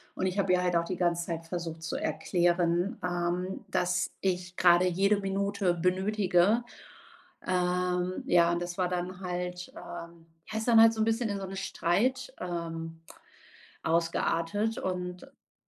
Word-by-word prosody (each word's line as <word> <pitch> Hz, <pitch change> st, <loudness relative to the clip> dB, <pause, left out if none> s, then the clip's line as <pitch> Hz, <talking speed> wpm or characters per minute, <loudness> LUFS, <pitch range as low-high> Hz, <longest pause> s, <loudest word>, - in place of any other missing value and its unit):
Und -, -, -1 dB
ich 185 Hz, +2 st, -2 dB
habe 195 Hz, -1 st, +2 dB
ihr 180 Hz, -, +3 dB
halt 180 Hz, -1 st, +1 dB
auch 170 Hz, 0 st, +2 dB
die 185 Hz, -, -3 dB
ganze 175 Hz, -1 st, 0 dB
Zeit 165 Hz, -1 st, -4 dB
versucht 165 Hz, -2 st, -5 dB
zu 160 Hz, -, -3 dB
erklären, 175 Hz, +3 st, +1 dB
ähm, 180 Hz, +1 st, -2 dB
dass 180 Hz, 0 st, 0 dB
ich 180 Hz, -1 st, -2 dB
gerade 175 Hz, 0 st, +5 dB
jede 200 Hz, +3 st, +2 dB
Minute 195 Hz, -1 st, 0 dB
benötige. 190 Hz, +3 st, +2 dB, 0.8 s
Ähm, 180 Hz, 0 st, 0 dB
ja, 170 Hz, -1 st, +4 dB
und 170 Hz, +1 st, -1 dB
das 175 Hz, +1 st, -5 dB
war 180 Hz, -, +1 dB
dann 180 Hz, +1 st, -3 dB
halt, 180 Hz, -1 st, -4 dB
ähm 170 Hz, -1 st, -9 dB, 0.2 s
ja, 220 Hz, -, -2 dB
ist 225 Hz, -, -3 dB
dann 225 Hz, -1 st, +7 dB
halt 225 Hz, 0 st, +8 dB
so 220 Hz, -, -4 dB
ein -, -, +4 dB
bisschen 225 Hz, +1 st, 0 dB
in 200 Hz, -1 st, -3 dB
so 190 Hz, -, -4 dB
'ne 195 Hz, -, -7 dB
Streit, 225 Hz, +8 st, 0 dB
ähm, 165 Hz, -2 st, -5 dB, 0.8 s
ausgeartet 170 Hz, +5 st, 0 dB
und 180 Hz, -1 st, -3 dB
ja, 275 Hz, 0 st, -19 dB
180 Hz, 160 wpm, -29 LUFS, 175-195 Hz, 0.8 s, halt